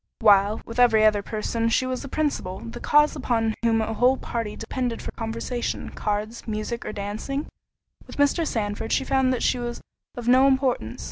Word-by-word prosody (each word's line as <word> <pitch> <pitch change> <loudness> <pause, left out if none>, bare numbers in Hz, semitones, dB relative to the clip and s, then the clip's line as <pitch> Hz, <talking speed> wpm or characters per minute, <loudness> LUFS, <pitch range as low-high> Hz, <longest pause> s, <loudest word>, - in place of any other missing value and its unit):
While, 205 -1 +4
with 230 +1 -6
every 225 -3 +5
other 210 -1 +4
person 225 +2 -2
she 245 +3 +2
was 255 0 -3
the 275 - -7
principle, 275 -11 -2
the 115 0 -8
cause 295 +1 +4
upon 225 -5 0
whom 225 -1 +2
a 220 +1 -2
whole 250 +4 +3
party 230 -4 -4
depended 240 +1 -3
for - - -6
conversation, 230 +2 -4
cards, 215 +3 -3
musick, 220 +2 -3
or - - -3
dancing, 215 +8 -4 0.6
with - - -11
Mr. 290 +3 +2
Sandford 220 -1 -2
she - - +2
found 265 -1 +2
that 250 - -1
she 250 - +2
was 240 0 -4 0.4
of 240 -1 -6
no 255 +2 +6
importance. 260 - 0
230 Hz, 185 wpm, -24 LUFS, 215-255 Hz, 0.6 s, no